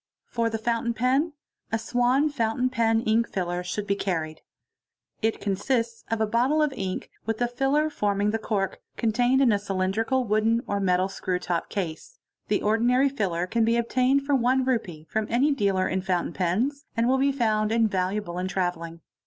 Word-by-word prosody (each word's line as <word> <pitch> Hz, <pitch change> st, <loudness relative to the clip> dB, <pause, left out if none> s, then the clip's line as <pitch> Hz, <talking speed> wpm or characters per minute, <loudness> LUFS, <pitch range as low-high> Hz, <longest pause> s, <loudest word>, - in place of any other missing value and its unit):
For 230 Hz, -1 st, -1 dB
the 225 Hz, -, -2 dB
fountain 235 Hz, +1 st, -1 dB
pen, 265 Hz, +7 st, +1 dB, 0.4 s
a 225 Hz, -, +2 dB
Swan 245 Hz, +5 st, +2 dB
Fountain 250 Hz, -2 st, 0 dB
Pen 225 Hz, -2 st, +2 dB
Ink 230 Hz, +1 st, +1 dB
filler 180 Hz, -1 st, -2 dB
should 200 Hz, +3 st, -3 dB
be 200 Hz, -, +1 dB
carried. 165 Hz, -6 st, -3 dB, 0.8 s
It 225 Hz, 0 st, 0 dB
consists 230 Hz, +4 st, -1 dB
of 225 Hz, 0 st, -1 dB
a 220 Hz, -, +3 dB
bottle 245 Hz, +8 st, +2 dB
of 295 Hz, -2 st, 0 dB
ink, 190 Hz, -6 st, -4 dB, 0.2 s
with 225 Hz, -1 st, -1 dB
a 245 Hz, -, +2 dB
filler 270 Hz, +5 st, +1 dB
forming 205 Hz, -7 st, 0 dB
the 225 Hz, -, -1 dB
cork, 195 Hz, -3 st, -2 dB, 0.2 s
contained 245 Hz, +4 st, +2 dB
in 255 Hz, -4 st, +5 dB
a 205 Hz, -, +2 dB
cylindrical 200 Hz, +6 st, 0 dB
wooden 225 Hz, +1 st, +2 dB
or 200 Hz, -, -1 dB
metal 185 Hz, -1 st, +2 dB
screw 190 Hz, -1 st, -2 dB
to 175 Hz, -1 st, -2 dB
) -, -, -34 dB
case. 195 Hz, -, -5 dB, 0.3 s
The -, -, 0 dB
ordinary 240 Hz, +5 st, +3 dB
filler 185 Hz, -10 st, -1 dB
can 230 Hz, +5 st, 0 dB
be 230 Hz, +1 st, +2 dB
obtained 255 Hz, +3 st, +2 dB
for 285 Hz, -, 0 dB
Re. 265 Hz, -, +3 dB, 0.4 s
1 155 Hz, -3 st, -11 dB
from 220 Hz, -1 st, -2 dB
any 260 Hz, +6 st, +3 dB
dealer 200 Hz, -8 st, +1 dB
it 190 Hz, 0 st, -2 dB
fountain 180 Hz, -3 st, -1 dB
pens, 235 Hz, -, -1 dB
and 230 Hz, +1 st, +2 dB
will 265 Hz, +1 st, +3 dB
be 275 Hz, +1 st, +3 dB
found 215 Hz, -5 st, +1 dB
invaluable 195 Hz, -4 st, 0 dB
in 185 Hz, -, -2 dB
travelling. 175 Hz, -3 st, -3 dB
220 Hz, 185 wpm, -26 LUFS, 190-245 Hz, 0.8 s, in